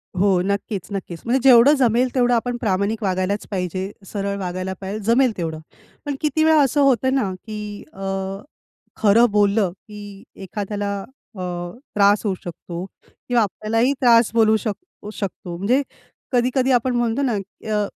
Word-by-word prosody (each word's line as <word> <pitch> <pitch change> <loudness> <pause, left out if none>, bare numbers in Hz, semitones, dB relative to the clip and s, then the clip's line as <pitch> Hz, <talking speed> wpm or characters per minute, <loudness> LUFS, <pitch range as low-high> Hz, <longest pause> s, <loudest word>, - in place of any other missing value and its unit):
हो. 190 -1 +3
नक्कीच, 200 -2 -2
नक्कीच. 185 -4 -5
म्हणजे 250 +3 +2
जेवढं 250 +4 +8
जमेल 250 -1 +2
तेवढं 245 -1 +3
आपण 240 +1 0
प्रामाणिक 210 0 -1
वागायलाच 190 +2 -1
पाहिजे, 185 +1 -3
सरळ 200 0 -3
वागायला 185 0 -3
पाहिजे, 200 +3 -4
जमेल 250 0 +4
तेवढं. 160 -2 -3 0.5
पण 285 -1 -2
किती 315 +1 +1
वेळा 315 -1 +5
असं 285 +1 +2
होतं 260 -1 +3
ना, 205 -8 0
की 210 -1 -7
अ, 195 0 -6 0.9
खरं 220 +3 +6
बोललं, 205 -2 +2
की 205 -1 -12 0.2
एखाद्याला 205 +1 -3 0.5
अ, - - -5 0.5
त्रास 205 0 +4
होऊ 195 -3 0
शकतो 175 +1 -7 0.2
किंवा 245 -2 -1
आपल्यालाही 225 +6 0
त्रास 230 -3 +5
बोलू 220 -1 +4
शक 210 0 -2 0.4
शकतो. 180 -3 -5
म्हणजे 245 +9 +2 0.5
कधी-कधी 255 +1 +2
आपण 245 0 +2
म्हणतो 240 +2 0
ना, 250 -4 +1 0.4
अ, 210 -1 +1
210 Hz, 145 wpm, -21 LUFS, 195-245 Hz, 0.9 s, जेवढं